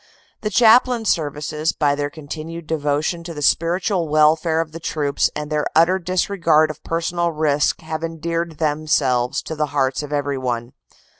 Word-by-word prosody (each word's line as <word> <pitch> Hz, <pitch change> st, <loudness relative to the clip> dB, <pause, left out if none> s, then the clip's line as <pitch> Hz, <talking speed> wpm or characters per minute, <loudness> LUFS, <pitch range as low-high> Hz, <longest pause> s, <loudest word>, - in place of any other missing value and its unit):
The 210 Hz, -, -1 dB
Chaplain 235 Hz, +1 st, +4 dB
Services 150 Hz, -2 st, -1 dB
by 145 Hz, -2 st, +1 dB
their 145 Hz, 0 st, -2 dB
continued 155 Hz, +2 st, -8 dB
devotion 155 Hz, +2 st, -1 dB
to 165 Hz, -1 st, -7 dB
the 150 Hz, -, -5 dB
spiritual 175 Hz, +3 st, +1 dB
welfare 155 Hz, +2 st, +3 dB
of 165 Hz, -1 st, -2 dB
the 165 Hz, -, -8 dB
troops 150 Hz, -3 st, 0 dB
and 150 Hz, 0 st, -5 dB
their 150 Hz, -1 st, 0 dB
utter 170 Hz, +4 st, +4 dB
disregard 170 Hz, -3 st, +2 dB
of 155 Hz, -, -14 dB
personal 170 Hz, +1 st, -1 dB
risk 150 Hz, -2 st, +1 dB
have 160 Hz, 0 st, -5 dB
endeared 165 Hz, 0 st, -3 dB
them 155 Hz, 0 st, -1 dB
selves 125 Hz, -4 st, +1 dB
to 160 Hz, -, -5 dB
the 150 Hz, 0 st, -1 dB
hearts 130 Hz, +1 st, +1 dB
of 150 Hz, -1 st, -8 dB
everyone. 130 Hz, -5 st, -2 dB
155 Hz, 160 wpm, -20 LUFS, 145-170 Hz, -, Chaplain